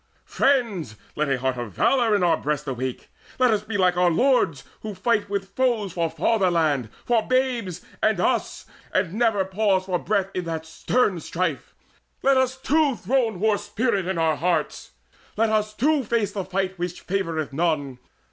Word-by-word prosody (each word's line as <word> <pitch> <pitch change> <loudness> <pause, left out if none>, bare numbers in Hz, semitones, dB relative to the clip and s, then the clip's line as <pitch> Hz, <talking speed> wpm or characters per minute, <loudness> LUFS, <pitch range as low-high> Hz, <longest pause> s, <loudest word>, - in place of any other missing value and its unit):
"Friends, 215 - +1 0.2
let 150 -1 0
a 135 - +1
heart 130 0 -1
of 120 -5 -5
valour 235 - +3
in 200 - +1
our 170 -2 +4
breasts 150 -1 -2
Awake! 130 -1 -4 0.3
Let 255 -2 +4
us 210 -2 +1
be 215 -1 -3
like 180 -2 +3
our 180 0 +4
lords, 235 - +2 0.2
who 215 -2 -6
fight 205 +1 0
With 200 -1 -3
foes 235 -8 +1
for 170 -2 0
fatherland, 165 - +1 0.2
for 230 -2 +1
babes, 245 -9 0 0.2
for 215 -4 +2
us, - - 0 0.3
And 185 -2 0
never 220 -3 +2
pause 190 -1 +1
for 180 -2 -1
breath 200 -2 -1
in 180 -1 -3
that 160 -1 -4
stern 190 +3 0
strife! 165 -2 -3 0.5
Let 275 0 +4
us 260 0 +1
too 285 0 +2
throne 230 -6 0
war's 215 0 +2
spirit 205 -5 -1
in 190 -2 -1
our 160 -2 +1
hearts! 170 -2 -1 0.4
Let 225 0 +2
us 215 0 +1
too 285 +6 +1
face 225 -2 0
the 195 -3 -4
fight 190 0 -2
which 175 0 -5
favoureth 165 -6 -2
none! 145 -5 -1
190 Hz, 175 wpm, -24 LUFS, 165-225 Hz, 0.5 s, our